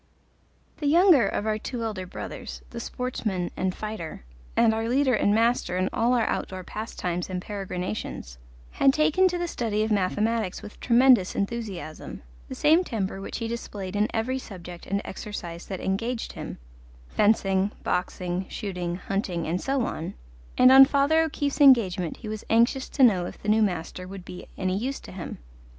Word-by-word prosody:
The 295 Hz, -, -2 dB
younger 325 Hz, -, +6 dB
of 205 Hz, -, -2 dB
our 215 Hz, 0 st, 0 dB
two 240 Hz, +1 st, -4 dB
elder 205 Hz, -5 st, -4 dB
brothers, -, -, -7 dB
the 235 Hz, -, -6 dB
sportsman 220 Hz, -8 st, -3 dB
and 185 Hz, -1 st, -1 dB
fighter, 210 Hz, -, -6 dB, 0.3 s
and 230 Hz, -1 st, +5 dB
our 225 Hz, +1 st, -1 dB
leader 260 Hz, +1 st, +3 dB
and 205 Hz, -, +3 dB
master 230 Hz, -3 st, +2 dB
in 185 Hz, +1 st, +1 dB
all 240 Hz, +2 st, +2 dB
our 235 Hz, -, +2 dB
outdoor 185 Hz, -1 st, -3 dB
pastimes 180 Hz, -4 st, -4 dB
and 185 Hz, -1 st, -2 dB
peregrinations, 185 Hz, -, -5 dB, 0.3 s
had 270 Hz, -1 st, +4 dB
taken 310 Hz, +5 st, +4 dB
to 355 Hz, -1 st, -1 dB
the 350 Hz, 0 st, -2 dB
study 220 Hz, -8 st, -1 dB
of 220 Hz, -, -2 dB
mathematics 210 Hz, +1 st, 0 dB
with 210 Hz, -, -11 dB
tremendous 240 Hz, -5 st, +5 dB
enthusiasm, 200 Hz, -7 st, -4 dB, 0.3 s
the -, -, -5 dB
same 320 Hz, +4 st, +4 dB
temper 195 Hz, -, -3 dB
which -, -, -5 dB
he 230 Hz, -, -3 dB
displayed 205 Hz, -4 st, -5 dB
in 210 Hz, +1 st, +2 dB
every 250 Hz, +4 st, -1 dB
subject 180 Hz, -6 st, -10 dB
and 200 Hz, +2 st, -1 dB
exercise 175 Hz, -4 st, -7 dB
that 190 Hz, -2 st, -5 dB
engaged 230 Hz, +5 st, -2 dB
him -, -, -7 dB, 0.5 s
fencing, 200 Hz, -2 st, +2 dB
boxing, 180 Hz, +1 st, -2 dB
shooting, 180 Hz, -4 st, -4 dB
hunting, 185 Hz, -3 st, -2 dB
and 170 Hz, +3 st, -1 dB
so 270 Hz, -2 st, 0 dB
on; 165 Hz, -, -4 dB, 0.4 s
and 255 Hz, +1 st, +7 dB
on 270 Hz, +1 st, +11 dB
Father 285 Hz, +3 st, +3 dB
O'Keefe's 290 Hz, -2 st, -1 dB
engagement 195 Hz, -, +5 dB
he 225 Hz, -, -9 dB
was 215 Hz, 0 st, -5 dB
anxious 235 Hz, +4 st, +3 dB
to 270 Hz, -, +2 dB
know 190 Hz, -8 st, +5 dB
if -, -, -10 dB
the 210 Hz, -, -4 dB
new 220 Hz, +1 st, +4 dB
master 180 Hz, -2 st, -2 dB
would 190 Hz, -1 st, -9 dB
be 180 Hz, -, -9 dB
any 185 Hz, -1 st, 0 dB
use 260 Hz, +7 st, -2 dB
to -, -, -12 dB
him. 185 Hz, -2 st, -7 dB
215 Hz, 170 wpm, -26 LUFS, 185-245 Hz, 0.5 s, on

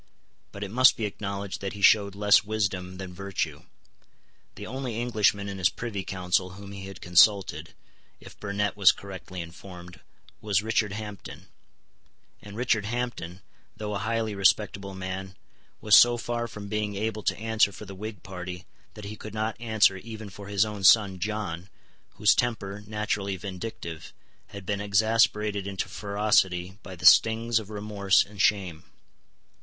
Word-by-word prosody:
But 100 Hz, -, -7 dB
it 100 Hz, -, -6 dB
must 130 Hz, +3 st, +5 dB
be 110 Hz, -, -2 dB
acknowledged 100 Hz, -1 st, -5 dB
that 100 Hz, -1 st, -4 dB
he 100 Hz, -, -9 dB
showed 100 Hz, -2 st, +5 dB
less 105 Hz, 0 st, +5 dB
wisdom 95 Hz, -3 st, -2 dB
than 95 Hz, -1 st, -7 dB
virtue. 100 Hz, +1 st, -4 dB, 0.9 s
The -, -, -8 dB
only 130 Hz, -4 st, -4 dB
Englishman 105 Hz, -4 st, +1 dB
in 100 Hz, -1 st, -6 dB
his 90 Hz, -, +4 dB
Privy 105 Hz, -5 st, -5 dB
Council 90 Hz, 0 st, -1 dB
whom 100 Hz, 0 st, -11 dB
he 95 Hz, -1 st, -8 dB
had 95 Hz, -1 st, -10 dB
consulted, 90 Hz, -3 st, +3 dB, 0.4 s
if -, -, -13 dB
Burnet 105 Hz, 0 st, -2 dB
was 100 Hz, -2 st, +7 dB
correctly 95 Hz, -2 st, -8 dB
informed, 90 Hz, +2 st, -11 dB, 0.4 s
was 105 Hz, -2 st, +1 dB
Richard 110 Hz, -2 st, 0 dB
Hampden; 100 Hz, -5 st, -8 dB, 0.9 s
and 105 Hz, 0 st, -11 dB
Richard 115 Hz, -4 st, +1 dB
Hampden, 110 Hz, -6 st, -4 dB, 0.4 s
though 105 Hz, -1 st, -4 dB
a 100 Hz, -, -2 dB
highly 110 Hz, +1 st, -1 dB
respectable 100 Hz, 0 st, +1 dB
man, 95 Hz, 0 st, -6 dB, 0.5 s
was 105 Hz, -1 st, +6 dB
so 120 Hz, 0 st, +7 dB
far 120 Hz, 0 st, -3 dB
from 105 Hz, -2 st, -9 dB
being 105 Hz, 0 st, -2 dB
able 110 Hz, +1 st, -2 dB
to -, -, -1 dB
answer 110 Hz, -2 st, +2 dB
for 105 Hz, -, -10 dB
the 100 Hz, -, -9 dB
Whig 105 Hz, -1 st, -8 dB
party 90 Hz, -1 st, -7 dB, 0.3 s
that 105 Hz, -, -9 dB
he 105 Hz, +2 st, -6 dB
could 110 Hz, 0 st, -9 dB
not 110 Hz, 0 st, -1 dB
answer 110 Hz, -4 st, +3 dB
even 110 Hz, +1 st, -9 dB
for 100 Hz, 0 st, -10 dB
his 100 Hz, 0 st, +2 dB
own 105 Hz, -2 st, -6 dB
son 95 Hz, -1 st, +5 dB
John, 100 Hz, -3 st, -4 dB, 0.5 s
whose -, -, +5 dB
temper, 105 Hz, -4 st, -2 dB
naturally 105 Hz, -2 st, -2 dB
vindictive, 95 Hz, -3 st, -7 dB, 0.3 s
had 100 Hz, -2 st, -10 dB
been 100 Hz, +1 st, -2 dB
exasperated 105 Hz, 0 st, +2 dB
into 100 Hz, -1 st, -3 dB
ferocity 100 Hz, -3 st, 0 dB
by 95 Hz, -, -9 dB
the 90 Hz, +1 st, -8 dB
stings 115 Hz, +3 st, +6 dB
of 105 Hz, -2 st, -10 dB
remorse 105 Hz, -1 st, +2 dB
and 100 Hz, -1 st, -6 dB
shame. 90 Hz, -5 st, +1 dB
100 Hz, 160 wpm, -27 LUFS, 95-110 Hz, 0.9 s, was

